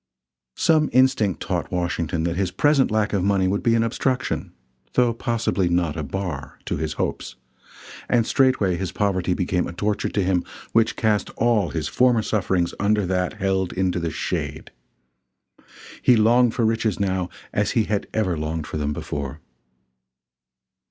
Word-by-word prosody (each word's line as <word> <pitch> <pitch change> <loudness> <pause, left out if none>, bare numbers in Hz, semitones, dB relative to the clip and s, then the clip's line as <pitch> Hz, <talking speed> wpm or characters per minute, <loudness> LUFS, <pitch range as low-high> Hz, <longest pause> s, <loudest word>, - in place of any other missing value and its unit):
Some 155 -2 +3
instinct 130 -7 +3
taught - - -2
Washington 85 -3 -1
that 85 0 -1
his 95 -1 0
present 145 +6 +3
lack 110 -1 0
of 95 -3 +1
money 95 -1 +2
would 100 +2 0
be 115 -1 +3
an 115 - +3
obstruction, 130 +3 -1 0.4
though 120 -2 +3
possibly 115 -6 0
not 85 -3 +1
a 80 - -3
bar, 75 -2 -5
to - - -2
his 80 -1 -2
hopes, - - -3 0.7
and 120 -2 +3
straightway 120 -9 +2
his 95 0 -3
poverty 95 -3 0
became 90 -1 0
a - - -7
torture 105 +3 -1
to 100 - 0
him 90 -1 +1 0.3
which 115 0 +2
cast 105 -3 +1
all 115 -6 +2
his 80 -1 -3
former 125 +1 +3
sufferings 95 -5 0
under 105 0 +2
that 90 +1 -1
held 95 -3 -1
into 90 -1 0
the 85 -1 -2
shade. 80 - -4 1.3
He 125 - +5
longed 115 +2 +4
for 120 - +1
riches 110 -3 0
now 95 -2 -1 0.2
as 105 - 0
he 115 - +4
had 105 -1 -2
never 100 -6 0
longed 80 0 -3
for - - -5
them 75 0 -1
before. 70 0 -5
95 Hz, 160 wpm, -23 LUFS, 85-115 Hz, 1.3 s, He